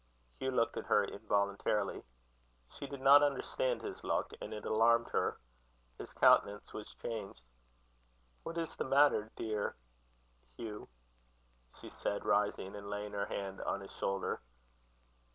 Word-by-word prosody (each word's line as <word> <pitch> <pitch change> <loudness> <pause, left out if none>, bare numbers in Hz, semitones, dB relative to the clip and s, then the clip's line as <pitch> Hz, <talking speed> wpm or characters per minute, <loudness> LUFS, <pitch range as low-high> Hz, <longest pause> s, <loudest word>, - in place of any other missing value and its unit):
Hugh 130 - -1
looked 115 -3 +1
at - - -5
her - - +4
involuntarily. 100 0 0 0.7
She 140 - -7
did 140 -1 -7
not 140 +2 +8
understand 475 - 0
his 395 -2 -6
look, - - -1
and - - -6
it 105 -1 -6
alarmed 115 +2 +4
her. - - 0 0.6
His - - -7
countenance 105 +1 +4
was 105 - -8
changed. 105 - -6 1.0
"What 165 +1 -6
is 165 -1 -3
the - - -2
matter, 135 -5 +4
dear 105 -2 -2 0.8
Hugh?" 105 -2 -7 0.9
she - - -9
said, 100 - -3
rising, 100 -1 +1
and 100 0 -7
laying 105 0 -4
her 100 -1 -1
hand 95 -1 -4
on 100 - -2
his 95 - -10
shoulder. 95 0 -2
105 Hz, 135 wpm, -34 LUFS, 100-135 Hz, 1.0 s, not